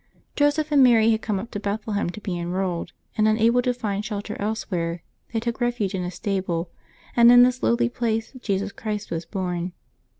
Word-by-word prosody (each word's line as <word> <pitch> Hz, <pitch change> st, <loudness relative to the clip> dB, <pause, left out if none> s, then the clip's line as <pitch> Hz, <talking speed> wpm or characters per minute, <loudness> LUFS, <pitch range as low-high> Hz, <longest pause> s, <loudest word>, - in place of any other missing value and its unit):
Joseph 295 Hz, +1 st, +2 dB
and 285 Hz, -2 st, +5 dB
Mary 230 Hz, -3 st, +6 dB
had 220 Hz, 0 st, +1 dB
come 210 Hz, -3 st, -1 dB
up 230 Hz, +4 st, -7 dB
to 205 Hz, -, -4 dB
Bethlehem 205 Hz, -1 st, -2 dB
to 180 Hz, -, -7 dB
be 185 Hz, -4 st, -4 dB
enrolled, 175 Hz, -1 st, -2 dB, 0.2 s
and, 215 Hz, 0 st, +3 dB
unable 230 Hz, +3 st, +3 dB
to 250 Hz, -, +1 dB
find 210 Hz, -4 st, -3 dB
shelter 210 Hz, -2 st, -4 dB
elsewhere, 180 Hz, -5 st, -2 dB, 0.3 s
they 225 Hz, -, 0 dB
took 235 Hz, +1 st, -4 dB
refuge 240 Hz, -5 st, 0 dB
in 190 Hz, -, -2 dB
a 180 Hz, -, -3 dB
stable, 180 Hz, -2 st, -2 dB, 0.4 s
and 235 Hz, 0 st, +8 dB
in 245 Hz, 0 st, +9 dB
this 250 Hz, 0 st, +2 dB
lowly 240 Hz, +1 st, +2 dB
place 225 Hz, -2 st, -2 dB
Jesus 200 Hz, -3 st, -1 dB
Christ 210 Hz, 0 st, -5 dB
was 165 Hz, 0 st, -3 dB
born. 180 Hz, -2 st, -3 dB
215 Hz, 190 wpm, -24 LUFS, 190-235 Hz, 0.4 s, in